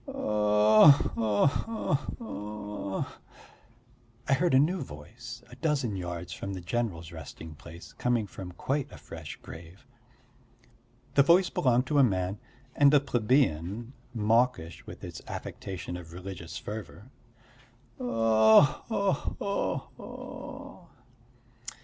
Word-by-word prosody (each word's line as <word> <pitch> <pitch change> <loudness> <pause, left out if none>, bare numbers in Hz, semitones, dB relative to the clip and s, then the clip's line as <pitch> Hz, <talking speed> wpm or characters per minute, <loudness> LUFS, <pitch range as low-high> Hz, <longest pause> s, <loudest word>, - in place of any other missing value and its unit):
"Oh 105 +3 +5 0.2
ho 110 -1 +2
ho 220 +8 -1 0.2
ho!" 105 - -5 1.2
I 140 - +4
heard 160 +1 +3
in 135 - +7
a - - +5
new 180 +3 -2
voice 120 - -9
a - - -10
dozen 135 -8 0
yards 90 -1 -5
from 100 0 -5
the 95 - -5
general's 85 -4 -2
resting 80 0 -9
place, 85 +3 -12
coming 120 -3 0
from 95 -2 -8
quite 140 +8 -2
a - - -10
fresh - - -8
grave. 85 +8 -11 1.3
The 140 - +6
voice 170 +5 +5
belonged 125 -1 +2
to 145 +2 +2
a - - +7
man 95 -3 0 0.4
and 140 -1 +6
a - - +8
plebeian, 120 - +1 0.2
mawkish 115 - +1
with - - -10
its - - -7
affectation 90 -2 -6
of 85 -2 -9
religious 90 -2 -7
fervour. 110 +3 -8 0.9
"Oh 115 +3 +5
ho 200 -3 +2
ho 200 0 -2 0.2
ho!" - - -9
110 Hz, 120 wpm, -29 LUFS, 90-130 Hz, 1.3 s, a